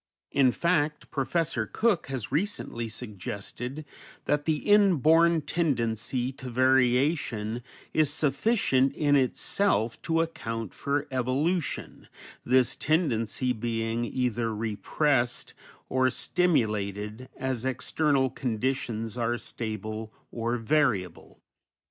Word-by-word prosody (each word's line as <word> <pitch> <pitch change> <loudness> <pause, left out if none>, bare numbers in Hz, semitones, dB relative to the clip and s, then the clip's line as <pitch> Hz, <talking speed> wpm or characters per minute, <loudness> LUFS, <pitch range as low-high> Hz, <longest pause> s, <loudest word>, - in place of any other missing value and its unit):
In 135 -2 +4
fact, 150 -1 0
Professor 135 -4 -1
Cook 220 - +1
has 130 -6 -4
recently 150 - -2
suggested 115 +6 -6 0.4
that 145 0 +1
the 160 - +2
inborn 170 -5 +5
tendency 125 -6 -1
to 130 - -7
variation 125 -2 +2 0.3
is 155 -2 +3
sufficient 140 - +2
in 145 -2 +3
itself 130 - +1
to 165 0 +1
account 115 - -4
for 140 +1 -1
evolution, 135 +7 -1 0.4
this 125 0 +3
tendency 125 - 0
being 115 0 -2
either 120 -2 -1
repressed 120 +4 0 0.3
or 130 0 +2
stimulated 110 - 0
as 130 -3 -2
external 130 +1 +1
conditions 115 -2 -2
are 120 +1 0
stable 110 -1 -5 0.2
or 120 +1 -1
variable. 115 - 0
130 Hz, 95 wpm, -28 LUFS, 115-150 Hz, 0.4 s, inborn